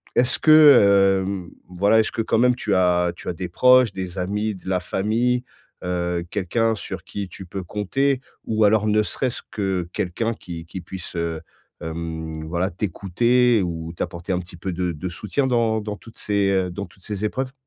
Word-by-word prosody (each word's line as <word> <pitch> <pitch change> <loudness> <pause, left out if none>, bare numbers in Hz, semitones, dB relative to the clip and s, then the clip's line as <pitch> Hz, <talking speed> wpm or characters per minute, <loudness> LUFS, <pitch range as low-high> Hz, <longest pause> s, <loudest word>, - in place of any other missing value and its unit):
est-ce 125 +1 +2
que, 100 -11 +7
hem, 95 -3 -4 0.2
voilà, 100 +5 +3
est-ce 110 - +1
que 115 - -1
quand 115 - +1
même 125 +2 +4
tu 110 -4 -2
as 90 -1 +3
tu - - -12
as - - -1
des 90 +1 -5
proches, 125 +4 +5
des 95 -1 -6
amis, 105 +3 -1
de 95 0 -9
la 90 -1 +1
famille, 115 +7 0 0.4
heu, 90 -1 -1
quelqu'un 110 +4 0
sur 95 -4 -7
qui 100 +1 -5
tu 95 +2 -10
peux 95 +2 -5
compter 130 +9 0 0.2
ou 110 -1 +1
alors 105 +1 +4
ne 105 0 +3
serait-ce 125 +3 -3
que 95 -4 -2
quelqu'un 110 +7 -2
qui 85 -6 -8
qui 85 +3 -7
puisse, 90 0 -8
heu, 85 -1 -2 0.4
hem, 80 -1 -5
voilà 85 +3 -1
t'écouter 110 +5 +2
ou 80 -1 -5
t'apporter 85 +1 -5
un 90 - +1
petit 90 0 -10
peu 95 +2 -4
de 90 0 -2
de 80 +4 -5
soutien 105 +10 -2
dans 115 -3 +1
dans 105 0 -5
toutes 115 - -15
ces, 100 -2 +1
heu, 95 -2 +1
dans 100 +3 -5
toutes 95 - -21
ces 105 -1 -3
épreuves? 130 +4 -3
95 Hz, 190 wpm, -23 LUFS, 90-110 Hz, 0.4 s, que